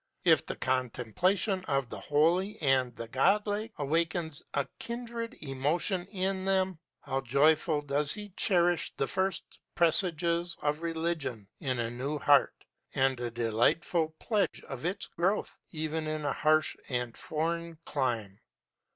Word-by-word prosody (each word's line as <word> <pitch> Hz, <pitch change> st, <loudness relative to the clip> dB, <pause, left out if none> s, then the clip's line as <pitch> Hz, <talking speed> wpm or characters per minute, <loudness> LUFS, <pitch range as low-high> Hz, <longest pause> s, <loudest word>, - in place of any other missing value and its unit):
If -, -, +5 dB
the -, -, -3 dB
contemplation 130 Hz, -, 0 dB
of 135 Hz, -4 st, 0 dB
the -, -, -5 dB
Holy 170 Hz, +7 st, +2 dB
and 130 Hz, -4 st, +2 dB
the 115 Hz, -, -6 dB
Godlike 205 Hz, -, +1 dB
awakens 160 Hz, +1 st, 0 dB
a 140 Hz, -1 st, 0 dB
kindred 235 Hz, -1 st, -5 dB
emotion 155 Hz, +7 st, 0 dB
in 190 Hz, -1 st, -2 dB
them, 190 Hz, -2 st, +1 dB, 0.2 s
how 135 Hz, -1 st, -2 dB
joyfully 145 Hz, +4 st, +3 dB
does 145 Hz, +1 st, +2 dB
he 210 Hz, -1 st, -3 dB
cherish 175 Hz, -3 st, +2 dB
the -, -, +1 dB
first 190 Hz, +4 st, 0 dB, 0.3 s
presages 170 Hz, 0 st, +3 dB
of 150 Hz, +1 st, 0 dB
religion 160 Hz, -, -2 dB
in 130 Hz, -3 st, -1 dB
a 115 Hz, -1 st, -2 dB
new 135 Hz, +5 st, -3 dB
heart, 145 Hz, -1 st, +3 dB, 0.3 s
as 135 Hz, 0 st, +3 dB
a 120 Hz, -1 st, -2 dB
delightful 120 Hz, +8 st, +1 dB
pledge 210 Hz, 0 st, 0 dB
of 135 Hz, +2 st, -6 dB
its 195 Hz, +3 st, -1 dB
growth 190 Hz, +5 st, -1 dB
even 155 Hz, -1 st, -3 dB
in 155 Hz, -1 st, -3 dB
a 145 Hz, -, +1 dB
harsh 155 Hz, 0 st, +2 dB
and 125 Hz, -2 st, -2 dB
foreign 165 Hz, +1 st, -3 dB
clime! 115 Hz, -8 st, -2 dB
155 Hz, 135 wpm, -30 LUFS, 135-180 Hz, 0.3 s, If